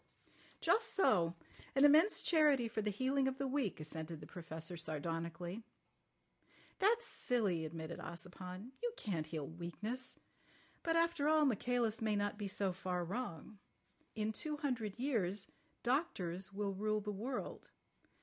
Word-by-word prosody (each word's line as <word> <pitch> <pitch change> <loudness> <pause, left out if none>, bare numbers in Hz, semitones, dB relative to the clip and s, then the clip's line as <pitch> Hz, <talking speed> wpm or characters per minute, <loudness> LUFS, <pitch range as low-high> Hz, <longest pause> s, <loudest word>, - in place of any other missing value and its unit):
"Just 450 - +2
so. 175 - +4 0.4
An 275 +1 +7
immense 315 +8 +6
charity 295 -7 +5
for 220 -1 -2
the 210 - 0
healing 265 +6 +2
of 265 0 -1
the 275 - -1
weak," 265 - 0
assented 160 +1 -4
the 150 - -9
Professor 165 +1 -4
sardonically. 170 +4 -3 1.2
"That's 450 +4 +4
silly," 200 -10 0
admitted 160 +1 -5
Ossipon. 180 +5 -7
"You 480 -1 -1
can't 165 -7 -2
heal 155 -3 -3
weakness. 210 +10 -4 0.6
But 330 -1 +1
after 335 -3 +3
all 310 -1 +5
Michaelis 240 -2 +1
may 215 -1 +2
not 205 +1 0
be 205 - -2
so 195 0 0
far 180 -1 -2
wrong. 205 -1 -4 0.6
In 215 0 0
two 300 +7 -1
hundred 240 -9 -1
years 210 -7 0 0.3
doctors 195 - 0
will 200 0 -1
rule 215 +2 0
the 210 0 -3
world. 240 +6 -4
210 Hz, 140 wpm, -37 LUFS, 175-265 Hz, 1.2 s, An